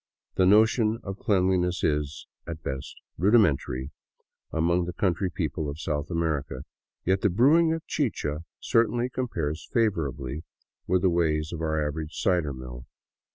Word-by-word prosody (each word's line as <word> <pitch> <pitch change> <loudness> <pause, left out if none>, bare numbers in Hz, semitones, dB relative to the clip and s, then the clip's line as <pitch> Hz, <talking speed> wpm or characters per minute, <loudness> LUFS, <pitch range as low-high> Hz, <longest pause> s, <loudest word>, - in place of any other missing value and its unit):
The 95 - +3
notion 110 +2 +4
of 95 0 -6
cleanliness 90 -2 +1
is, 75 -1 -1 0.2
at 80 -2 -6
best, 65 0 -5 0.2
rudimentary 75 - +2 0.6
among 85 +2 +1
the 90 - -5
country 95 0 0
people 80 -3 -3
of 70 +2 -6
South 75 -2 -2
America, 75 -6 -2 0.4
yet 95 +1 +2
the 105 - +3
brewing 150 - +4
of 165 0 -3
chicha 85 - -1 0.2
certainly 120 +2 +1
compares 85 - -3
favorably 75 - -1 0.4
with 90 +1 +2
the 95 - +4
ways 80 -2 +1
of 80 - -5
our 80 -2 0
average 80 +1 -5
cider 85 -6 +1
mill. 65 -2 -9
85 Hz, 140 wpm, -27 LUFS, 75-100 Hz, 0.6 s, notion